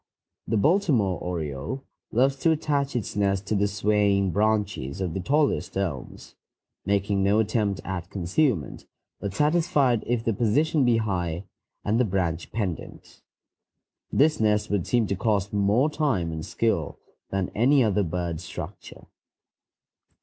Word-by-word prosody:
The 110 - +1
Baltimore 130 - +2
oriole 80 - -4 0.3
loves 135 +4 +3
to 165 - +2
attach 145 -4 0
its 120 - -3
nest 100 -1 +1
to 105 - -1
the 100 +1 +2
swaying 100 -1 +2
branches 105 -7 0
of 90 -4 -2
the 95 - -2
tallest 145 - 0
elms, 85 -10 -4 0.5
making 100 0 +1
no 100 +2 +3
attempt 105 -3 0
at 90 -1 -4
concealment, 100 - -1 0.3
but 100 -1 -5
satisfied 150 - +2
if 120 -1 0
the 115 - +2
position 135 +8 +2
be 120 -2 +4
high 90 -5 -2 0.4
and 110 +3 +2
the - - +5
branch 90 -4 -2
pendent. 95 -7 -5 0.9
This 155 +2 +3
nest 105 -1 +1
would 100 -4 0
seem 120 -2 +2
to 100 - -1
cost 105 -1 0
more 105 +7 +3
time 140 - 0
and 80 -1 -5
skill - - -1 0.3
than 95 -2 -2
any 130 +5 +4
other 105 -2 +2
bird 85 -2 -2
structure. 90 - -9
105 Hz, 140 wpm, -25 LUFS, 95-120 Hz, 0.9 s, the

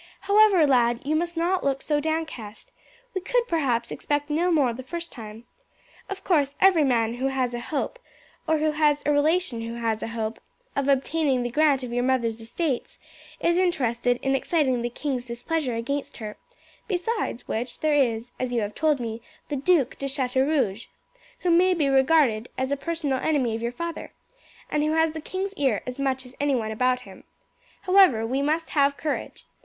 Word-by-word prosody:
However, 405 -5 +5
lad, 240 -3 +3
you 300 +3 0
must 340 +1 -1
not 360 +3 +1
look 275 -1 0
so 295 -1 +1
downcast. 310 -9 -4 0.4
We 375 - -2
could 475 +5 0
perhaps 250 - 0
expect 290 0 -2
no 345 +4 +2
more 280 -7 +3
the 250 - -7
first 335 +6 -6
time. 220 -1 -9 0.7
Of 390 -1 -6
course 290 -6 +2
every 375 -5 +5
man 230 -4 +2
who 255 +2 -1
has 260 -2 -1
a 240 - -3
hope, 300 - -3 0.5
or 315 0 +3
who 310 0 +1
has 300 -1 +2
a 295 - +3
relation 295 -3 +1
who 230 +1 -5
has 225 -2 -1
a - - -3
hope, 225 -1 -4 0.4
of 280 -1 0
obtaining 275 -1 +1
the 240 - -3
grant 290 -1 +3
of 240 -1 -5
your 245 - +1
mother's 235 -3 0
estates 255 +4 -3 0.4
is 340 +1 +2
interested 245 -9 +1
in 270 - +1
exciting 270 -4 +1
the 240 - -1
king's 255 0 -3
displeasure 245 +2 -2
against 275 +5 -3
her; 215 -3 -6 0.5
besides 375 - -2
which 240 +3 -3
there 310 -1 +2
is, 240 -4 +1
as 255 -1 -2
you 240 -2 +1
have 205 0 -3
told 305 0 +1
me, 230 -1 -4 0.3
the 295 - -1
Duc 280 -2 +2
de 275 - -2
Chateaurouge, 265 -4 0 0.5
who 355 - +2
may 365 +2 +4
be 305 -4 +1
regarded 265 -4 +3
as 260 +1 -1
a - - +2
personal 290 -2 -2
enemy 265 -7 +1
of 225 - -5
your 235 +1 -1
father, 335 +6 -5 0.6
and 300 - +1
who 305 +1 +1
has 320 0 +3
the 315 0 -6
king's 380 +5 -4
ear 260 -8 +1
as 250 +2 -6
much 265 -1 -1
as 250 - -12
anyone 260 -7 0
about 250 +3 +1
him. - - -13 0.6
However, 365 - +5
we 260 +4 -1
must 310 +3 0
have 280 -1 +2
courage. 300 -1 -4
275 Hz, 185 wpm, -25 LUFS, 240-315 Hz, 0.7 s, However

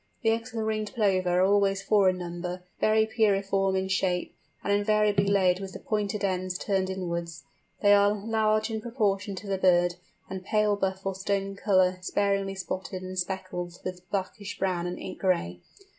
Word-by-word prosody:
The 225 - +4
eggs 225 +2 -2
of 230 - -7
the 220 - 0
Ringed 215 +1 -2
Plover 185 -5 +2
are - - +5
always 195 0 +2
four 200 -2 +4
in 185 - -1
number, 175 +1 -5 0.2
very 220 0 +4
pyriform 195 -3 +1
in 190 0 -1
shape, 190 -2 0 0.3
and 200 - +1
invariably 205 -1 +2
laid 190 -2 +3
with 195 -1 -7
the - - -7
pointed 210 -1 -2
ends 185 -1 -1
turned 190 -1 0
inwards. 170 -3 -4 0.4
They 205 0 +7
are 205 0 +5
large 215 +1 0
in 220 -1 -3
proportion 205 -4 -1
to 200 +2 -8
the 195 -1 -1
bird, 175 -1 +3 0.3
and 190 0 -6
pale 210 +1 +2
buff 190 -1 -2
or 195 - 0
stone 195 +1 -2
colour 185 -2 +2
sparingly 195 0 0
spotted 185 0 -5
and 185 0 -6
speckled 180 -1 -4
with 180 0 -6
blackish 200 +1 -4
brown 180 -2 -1
and 175 - -4
ink 185 - -7
gray. 170 - 0
195 Hz, 180 wpm, -27 LUFS, 185-205 Hz, 0.4 s, They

